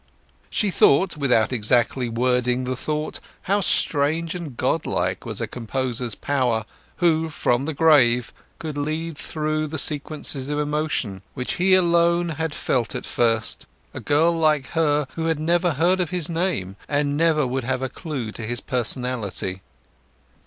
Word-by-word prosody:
She 205 -3 +1
thought, 175 +2 +4
without 130 -5 +2
exactly 120 +2 +1
wording 125 +1 +1
the 130 0 -2
thought, 150 +4 -3 0.2
how 200 +2 +1
strange 160 -1 +1
and 165 -9 -7
god - - 0
like - - -1
was - - -3
a - - -1
composer's 125 -1 -3
power, 125 -6 0 0.3
who 165 -2 +2
from 130 -3 0
the 160 - -2
grave 130 -7 +4 0.2
could 155 -3 -5
lead 155 +2 -3
through 155 0 -2
sequences 145 -2 -1
of 150 - -1
emotion, 150 - -1
which 125 - -2
he 185 0 +5
alone 170 -1 +3
had 160 0 -2
felt 120 -4 -1
at - - -4
first, 115 -2 +1 0.3
a - - -6
girl 155 +3 +3
like 155 -4 +1
her 150 -3 +1
who 165 - -3
had 165 -2 0
never 170 +2 +2
heard 175 +6 +2
of 175 -4 0
his 175 -3 -1
name, 165 - -2
and 145 0 +1
never 155 -2 +3
would 130 +1 -2
have 130 +1 -1
a - - 0
clue 135 - -5
to 115 - -7
his 120 +1 +1
personality. 120 -6 -2
145 Hz, 155 wpm, -23 LUFS, 125-160 Hz, 0.3 s, he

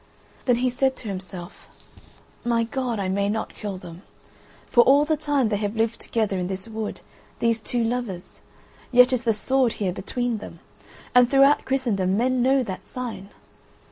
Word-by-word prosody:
Then 245 - +4
he 250 +1 +1
said 265 +1 +1
to 225 - -10
himself: 185 -2 -7 0.8
"My 235 -1 +1
God, 245 0 -2
I 195 -2 -2
may 200 +2 0
not 220 +1 -3
kill 205 -3 -5
them. 175 -1 -11 0.6
For 240 - +5
all 280 +4 +5
the 310 +1 +1
time 290 -5 +1
they 205 - 0
have 205 +1 -3
lived 225 +1 0
together 210 -5 -1
in 180 - -2
this 190 +3 -4
wood, 220 -1 -5 0.4
these 230 -1 +1
two 240 +2 -1
lovers, 225 -6 -4 0.5
yet 250 +1 +6
is 255 -1 0
the 230 - +4
sword 255 +2 +1
here 190 -4 -2
between 235 +4 -2
them, 210 - -10 0.6
and 250 -1 +6
throughout 275 +2 +5
Christendom 205 -8 0
men 255 +2 +1
know 265 +1 +3
that 190 -5 -7
sign. 225 -7 -6
230 Hz, 175 wpm, -24 LUFS, 200-255 Hz, 0.8 s, yet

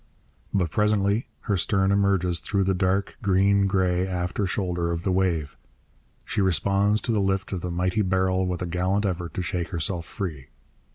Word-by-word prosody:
But 90 -5 0
presently 105 +1 +1
her 105 - 0
stern 95 +2 +1
emerges 95 -4 +2
through 100 -2 0
the 95 0 +1
dark, 95 +1 0
green 100 0 +3
grey 95 -1 +1
after 90 +2 -2
shoulder 90 -2 -1
of 85 0 -2
the 95 - 0
wave. 85 -6 0 0.7
She - - -1
responds 100 +3 +2
to 120 - -1
the 105 -2 +2
lift 95 0 -1
of 95 -3 -3
the 90 - -3
mighty 90 +4 0
barrel 95 -1 +1
with 90 0 -2
a - - -2
gallant 90 +4 0
effort 85 -4 -3
to 90 - -2
shake 90 -2 -2
herself 85 -1 -2
free. 80 -10 -5
95 Hz, 175 wpm, -25 LUFS, 90-100 Hz, 0.7 s, green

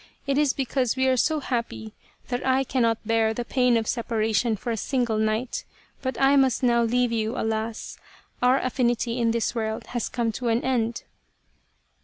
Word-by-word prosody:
It 280 0 +1
is 295 -3 +3
be 270 - -2
cause 255 -1 0
we 260 0 +1
are 260 - +4
so 310 +5 +1
happy 235 -4 -3 0.4
that 245 0 -2
I 265 0 +2
cannot 230 -4 0
bear 225 0 +2
the 240 - -3
pain 250 -2 +2
of 225 -1 -2
separation 225 -1 0
for 235 +3 -4
a - - 0
single 235 -1 -1
night. 220 +3 -1 0.4
But 260 -1 -3
I 275 +1 +5
must 265 -1 +2
now 235 -1 +4
leave 245 +1 +1
you, 225 +1 -1
alas! 220 0 -3 0.4
Our 250 +2 +4
affinity 245 -2 0
in 230 -1 +2
this 230 0 0
world 220 -2 -3
has 240 -2 -2
come 235 -2 -1
to 240 +3 -4
an 230 +1 +1
end." 235 -3 -1
240 Hz, 185 wpm, -25 LUFS, 225-255 Hz, 0.4 s, I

